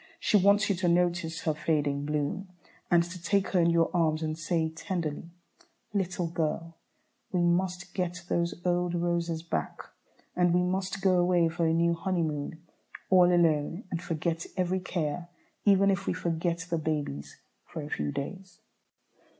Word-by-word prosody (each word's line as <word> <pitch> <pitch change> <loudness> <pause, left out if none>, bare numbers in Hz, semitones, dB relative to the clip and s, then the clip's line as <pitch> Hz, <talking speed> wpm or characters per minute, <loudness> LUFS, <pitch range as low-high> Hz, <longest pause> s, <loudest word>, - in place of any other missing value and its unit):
She - - +1
wants 200 +1 +5
you 200 - +2
to 180 0 0
notice 170 -1 +1
her 155 - 0
fading 145 -2 0
bloom, 150 +6 -2 0.4
and 170 -1 +5
to 175 +1 -8
take 200 +3 +1
her 185 - +2
in 170 0 +4
your 170 -1 +3
arms 160 -2 +2
and 155 0 -1
say, 160 0 0
tenderly, 165 -1 -4 0.6
"Little 180 -3 -1
girl, 165 0 -2 0.6
we 180 - +1
must 180 +1 0
get 180 -1 -2
those 170 0 -1
old 175 0 +1
roses 170 -1 -1
back. 170 - -3 0.5
And 175 -1 +3
we 180 - +3
must 190 +1 -2
go 185 -2 +4
away 175 -1 +3
for 165 0 0
a 160 - +2
new 170 0 +3
honeymoon, 165 -3 -2 0.5
all 180 -1 +6
alone, 165 +2 +2
and 170 - -2
forget 165 -1 -2
every 185 0 +1
care, 175 -2 -3 0.4
even 200 -1 +5
if 195 0 -2
we - - +2
forget 170 0 -1
the 170 -2 -1
babies 145 - -3 0.2
for 160 - -7
a 145 - -7
few 75 -1 -1
days." 185 +6 -6
170 Hz, 160 wpm, -29 LUFS, 160-180 Hz, 0.6 s, all